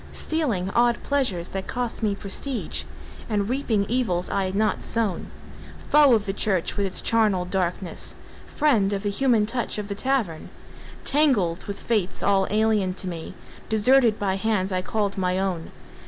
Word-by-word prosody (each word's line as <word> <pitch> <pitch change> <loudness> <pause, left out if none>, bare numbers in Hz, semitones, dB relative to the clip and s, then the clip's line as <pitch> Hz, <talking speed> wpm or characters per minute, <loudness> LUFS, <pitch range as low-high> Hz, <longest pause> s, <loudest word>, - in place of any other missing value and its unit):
Stealing 235 - -1
odd 240 +1 +3
pleasures 245 -12 0
that 195 0 -5
cost 245 -2 -3
me 210 -2 +1
prestige, 230 +6 -3 0.4
And 205 -2 0
reaping 235 -5 0
evils 220 -8 0
I 195 - 0
had 185 +1 -3
not 215 +1 +1
sown; 215 -7 -1 0.6
Foe 290 -4 +6
of 215 -2 -1
the 195 - -2
church 195 -4 0
with 200 -1 0
its 185 - +1
charnel 215 -6 +2
dankness, 180 -1 -2 0.3
Friend 225 -10 +2
of 195 0 -3
the 205 - 0
human 230 -1 +2
touch 235 0 -1
of 210 -1 -5
the - - -1
tavern; 215 -8 -1 0.5
Tangled 240 - +2
with 200 -1 -6
fates 210 -6 -1
all 195 -1 +3
alien 210 -3 +1
to 190 - -5
me, 165 -2 -6 0.3
Deserted 230 +1 +4
by 195 -2 -1
hands 195 -2 0
I 185 0 0
called 200 0 -2
my 180 0 0
own. 185 -4 -2
205 Hz, 165 wpm, -24 LUFS, 190-235 Hz, 0.6 s, Foe